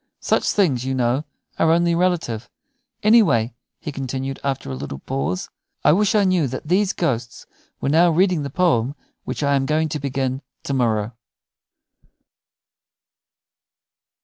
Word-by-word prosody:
Such - - +1
things, 145 - +2
you 130 0 -2
know, 125 +3 0 0.3
are 165 - +4
only 170 +1 +3
relative. 170 -10 0 0.5
Anyway," 205 - +4 0.3
he 150 - -5
continued, 135 0 -4
after 135 - -2
a - - -3
little 70 +1 -6
pause, 90 - -3 0.3
"I - - +6
wish 205 +5 +3
I 210 - +4
knew 185 -6 +2
that 130 +4 -6
those 190 +3 +2
ghosts 120 -8 -2 0.3
were - - -1
now 165 +4 +5
reading 180 0 +2
the 140 - -4
poem 140 -6 +1 0.3
which - - -3
I 140 0 +2
am 135 -1 +1
going 155 +1 +1
to 150 0 -3
begin 135 -1 -2 0.2
to 140 - -3
morrow." 115 -4 +1
140 Hz, 145 wpm, -21 LUFS, 125-170 Hz, 0.5 s, I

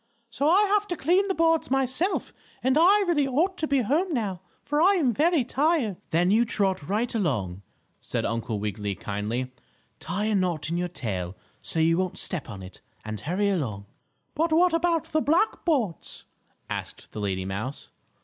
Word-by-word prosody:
So 285 +5 +1
I 380 +5 +5
have 415 0 +2
to 350 - -3
clean 360 +8 +2
the 385 - -1
boards 330 -1 +2
myself. 270 +8 0 0.3
And 260 +1 +3
I 385 +6 +5
really 295 -5 +2
ought 330 +9 +1
to 310 - 0
be 275 -3 +2
home 325 - +1
now, 195 -7 -2 0.2
for 295 +1 0
I 390 +4 +5
am 275 -10 +2
very 315 +2 +3
tired." 265 - +1
"Then 175 +3 +2
you 225 +3 +5
trot 190 -8 0
right 220 +4 0
along," 105 - -1 0.4
said - - -3
Uncle 115 -1 -2
Wiggily, 105 -1 -3
kindly. 110 +7 -3 0.5
"Tie 200 +4 -2
a 215 - +1
knot 175 -5 0
in 170 - 0
your 180 0 -1
tail, 95 - -4 0.3
so 165 - -1
you 165 +2 +3
won't 185 -1 -2
step 160 -8 -2
on 100 -4 -8
it, 90 0 -12 0.2
and 110 -1 -4
hurry 190 - 0
along." 120 - -2 0.5
"But 320 +2 0
what 345 +2 +4
about 330 -1 +2
the 310 - +2
black 335 +10 +1
boards?" 250 - -1 0.4
asked - - -6
the - - -7
lady 95 -2 -2
mouse. 105 +9 -5
215 Hz, 180 wpm, -26 LUFS, -, 0.5 s, I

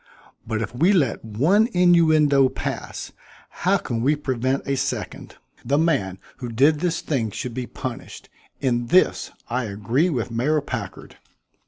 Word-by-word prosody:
But 110 0 -1
if 110 - -6
we 170 +11 +3
let 145 - +1
one 155 - +2
innuendo 155 -6 +4
pass, - - -5 0.4
how - - +1
can 115 -1 -4
we 145 +5 +3
prevent 130 -2 -2
a 140 - +1
second? 130 - -4 0.3
The 140 +4 +1
man 140 - +1 0.2
who 125 - -6
did 140 +7 +3
this 170 0 -1
thing 125 -8 -1
should 120 +4 -5
be 125 0 -4
punished. - - -7 0.3
In 120 -3 0
this 185 +8 +3 0.2
I 125 +1 -2
agree 115 - 0
with 125 -7 -2
Mayor 135 +7 +1
Packard." 125 -8 -7
130 Hz, 150 wpm, -23 LUFS, 115-155 Hz, 0.4 s, innuendo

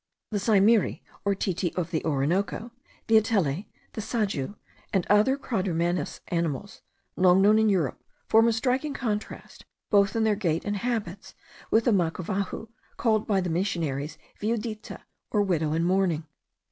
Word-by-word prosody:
The 205 - 0
saimiri, 210 +1 +3 0.2
or 200 0 +1
titi 185 -2 -1
of 175 -2 -2
the 160 - -1
Orinoco, 170 - -1 0.3
the 225 - +5
atele, 195 - 0 0.3
the 220 - -4
sajou, 205 - -2 0.4
and 190 -5 +1
other 215 +7 +4
quadrumanous 180 -8 -1
animals 170 +2 -2 0.3
long 180 0 +5
known 210 +3 +5
in 220 0 +4
Europe, 175 -10 0 0.2
form 225 +1 +5
a 230 - +3
striking 260 +5 0
contrast, 215 -4 -4 0.3
both 200 -1 +4
in 225 - +2
their 220 -1 +3
gait 170 -6 -1
and 205 0 -1
habits, 205 -5 -4 0.3
with 225 +1 +3
the 240 - +4
macavahu, 190 +3 -1 0.3
called 220 -2 +1
by 195 -3 +2
the 180 -2 -2
missionaries 160 -5 -2 0.2
viudita, 215 0 -3 0.3
or 210 - +2
widow 160 -6 0
in 165 +1 +1
mourning. 175 -3 +1
200 Hz, 145 wpm, -27 LUFS, 175-220 Hz, 0.4 s, the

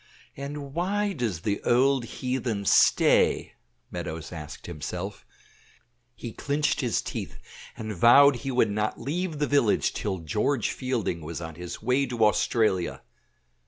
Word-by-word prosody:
"And 140 0 -6
why 200 +5 0
does 115 - -2
the 100 +2 -1
old 130 +1 +3
heathen 120 -5 -3
stay?" - - +4 0.4
Meadows 80 0 -5
asked 75 -3 -8
himself; 90 +5 -6 0.9
he 115 -2 -7
clinched 145 +2 0
his 120 -3 0
teeth - - -6 0.4
and 110 -1 -5
vowed 130 +7 +7
he 130 +3 -5
would 125 -5 +2
not 105 +1 -1
leave 160 +5 -3
the 145 - +1
village 140 -7 +2
till 100 -3 -2
George 105 - 0
Fielding 120 -10 -2
was 80 +2 -6
on 80 -1 -6
his 90 +5 -8
way 130 +4 +2
to 120 -3 +2
Australia. 105 -4 +1
120 Hz, 135 wpm, -26 LUFS, 95-140 Hz, 0.9 s, vowed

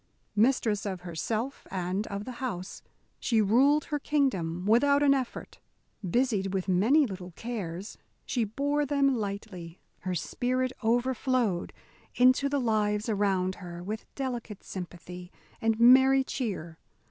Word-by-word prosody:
Mistress 220 -2 +2
of 190 -2 -4
herself 215 +9 -4
and 185 +2 -2
of 200 +1 -5
the 255 - -5
house, 185 -8 -4 0.4
she 230 -3 +1
ruled 265 +8 +4
her 295 - -2
kingdom 190 - 0
without 280 +7 +4
an 280 -1 +6
effort. 260 -3 -4 0.4
Busied 195 -1 0
with 190 0 -2
many 225 +12 +4
little 185 -5 -7
cares, 200 -5 -5 0.3
she 240 - 0
bore 285 +7 0
them 280 -1 +2
lightly. 200 -5 -5 0.2
Her 185 -1 -3
spirit 250 +10 -1
overflowed 240 -4 +1 0.4
into 255 +3 +4
the 285 0 0
lives 215 -2 0
around 195 -3 +1
her 175 -1 -8
with 215 +4 -5
delicate 240 -6 -5
sympathy 180 0 -8 0.3
and 225 0 +1
merry 265 +3 +7
cheer. 190 - -4
220 Hz, 130 wpm, -28 LUFS, 185-255 Hz, 0.4 s, merry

